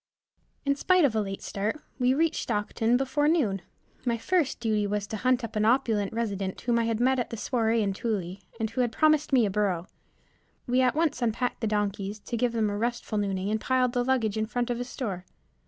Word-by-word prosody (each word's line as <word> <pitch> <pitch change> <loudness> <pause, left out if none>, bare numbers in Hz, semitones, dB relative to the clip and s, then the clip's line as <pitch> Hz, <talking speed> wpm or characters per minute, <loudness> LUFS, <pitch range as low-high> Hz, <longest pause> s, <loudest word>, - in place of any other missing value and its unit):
In 280 0 +2
spite 365 +3 +4
of 260 - +2
a 215 - +2
late 195 -1 -5
start, 210 +9 -2 0.2
we 255 +1 +3
reached 325 +1 +1
Stockton 225 +2 +1
before 270 +3 +1
noon. 240 - +2 0.4
My 235 -2 0
first 330 +4 0
duty 215 -3 +1
was 205 0 -1
to 215 +1 -5
hunt 255 +2 +2
up 230 - -6
an 215 - +1
opulent 220 -4 +2
resident, 200 -4 -3
whom 235 -1 +1
I 230 - +1
had 225 -1 0
met 260 +2 +3
at 245 - -2
the 230 - -5
soiree 225 -1 +1
in 200 -1 0
Tooele, 195 -3 -3 0.2
and 225 - 0
who 250 - 0
had 240 -2 +1
promised 310 +3 +3
me 250 -4 +5
a 200 - -1
burro. 190 -4 0 0.8
We 250 0 +2
at 255 0 +2
once 305 -5 +1
unpacked 240 +2 -1
the 225 - 0
donkeys, 205 -1 -1
to 235 - -5
give 245 +1 +1
them 220 -3 +1
a 205 - -2
restful 235 -2 -1
nooning, 195 0 -1
and 220 0 0
piled 255 -1 +1
the 245 - +1
luggage 240 -5 +1
in 220 0 0
front 245 +1 -1
of 240 - -2
a - - -1
store. 205 -8 -4
230 Hz, 220 wpm, -27 LUFS, 210-255 Hz, 0.8 s, me